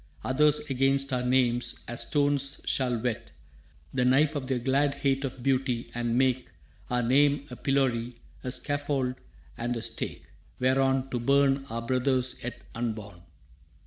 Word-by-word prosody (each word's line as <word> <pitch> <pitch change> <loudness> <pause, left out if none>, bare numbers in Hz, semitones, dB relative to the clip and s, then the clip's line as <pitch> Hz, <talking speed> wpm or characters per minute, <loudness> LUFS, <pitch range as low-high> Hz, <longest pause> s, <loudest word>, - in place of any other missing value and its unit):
Others 150 +3 +3
against 135 0 +2
our 125 - +1
names, 125 -2 +1
as 120 0 -2
stones, 145 -2 +1
shall 125 -3 +1
whet 120 0 -3 0.6
The 125 - +1
knife 145 +5 +3
of 135 -3 -3
their 130 -1 0
glad 140 +3 +1
hate 135 -1 0
of 130 -2 -5
beauty, 130 -3 0
and 120 0 -1
make 130 -1 +2 0.4
Our 125 0 +1
name 140 +3 +3
a - - -5
pillory, 125 -3 0 0.3
a 125 - -3
scaffold 145 -2 -1 0.5
and 120 +1 -1
a 115 - -5
stake - - -5 0.3
Whereon 135 +1 +2
to 120 - -1
burn 140 +2 +3
our 115 +1 -4
brothers 130 +1 0
yet 125 - -6
unborn. 110 -6 -4
130 Hz, 145 wpm, -28 LUFS, 120-140 Hz, 0.6 s, Others